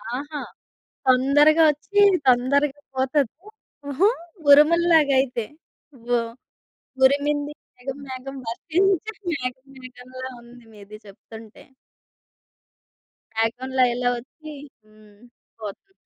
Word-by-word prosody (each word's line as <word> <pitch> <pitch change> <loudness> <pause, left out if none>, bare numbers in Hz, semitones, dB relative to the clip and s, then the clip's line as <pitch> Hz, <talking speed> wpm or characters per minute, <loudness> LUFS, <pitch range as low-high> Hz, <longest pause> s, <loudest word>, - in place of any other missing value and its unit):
ఆహా! 290 +2 -6 0.7
తొందరగా 290 +5 +5
ఒచ్చి 400 +8 -1 0.3
తొందరగా 275 +3 +2
పోతది. 265 -1 0 0.5
హుహు. 285 +8 +2 0.4
ఉరుముల్లాగైతే 295 -5 +4 0.7
ఓహ్! 230 0 -4 0.7
'ఉరిమింది 290 +2 +2 0.2
మేఘం 260 +2 -6
మేఘం 265 +1 -7
వర్షించి 370 - 0 0.2
మేఘం 260 -1 -5
మేఘంలా' 255 +1 -10
ఉంది 240 0 -16
మీది 210 0 -12
జెప్తుంటే. 220 +2 -14 1.7
బ్యాక్‌గ్రౌండ్‌లో 250 +4 0
ఇలా 245 0 0
ఒచ్చి 305 +5 -13 0.3
హ్మ్. 215 -1 -21 0.4
పోతుంది. 215 - -9
265 Hz, 80 wpm, -23 LUFS, 245-295 Hz, 1.7 s, తొందరగా